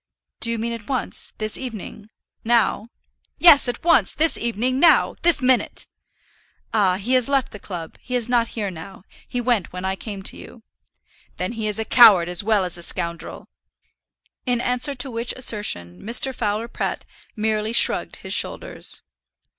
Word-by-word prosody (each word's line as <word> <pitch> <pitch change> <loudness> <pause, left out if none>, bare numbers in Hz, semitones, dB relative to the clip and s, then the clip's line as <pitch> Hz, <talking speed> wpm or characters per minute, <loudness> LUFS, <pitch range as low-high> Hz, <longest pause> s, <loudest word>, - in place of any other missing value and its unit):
"Do 230 - +1
you 230 - -1
mean 230 +1 -3
at 230 -2 -9
once 260 -3 -2
this 215 -1 -2
evening, 220 -4 -8 0.3
now?" 230 -2 +1 0.5
"Yes, 320 -6 +7
at 245 - -4
once 340 0 +3
this 320 +1 +3
evening, 235 +3 -1
now; 340 - +4
this 335 -5 +3
minute." 255 -1 +1 0.9
"Ah; 195 -4 +3
he 210 +7 -2
has 255 0 +3
left 275 -3 +1
the 210 - -9
club; 175 -5 -8
he 250 - -5
is 240 -2 0
not 240 -2 +2
here 205 -3 -2
now; 175 +2 -11 0.2
he 245 - -3
went 240 -6 0
when 180 +1 -6
I 190 0 -1
came 200 -1 -8
to - - -4
you." 230 - -13 0.7
"Then 180 +3 -2
he 225 -2 -3
is 210 - -2
a 220 - -2
coward 200 -9 +7
as 180 +2 -1
well 210 -3 +2
as 175 -1 -5
a - - -9
scoundrel." 170 0 -2 1.0
In 245 -1 +1
answer 250 +4 0
to 265 +1 -1
which 230 +1 -2
assertion, 205 - -2
Mr. 245 +4 +1
Fowler 215 -1 -2
Pratt - - -4 0.3
merely 215 0 -1
shrugged 235 - +2
his - - -5
shoulders. - - -2
225 Hz, 170 wpm, -22 LUFS, 200-250 Hz, 1.0 s, Yes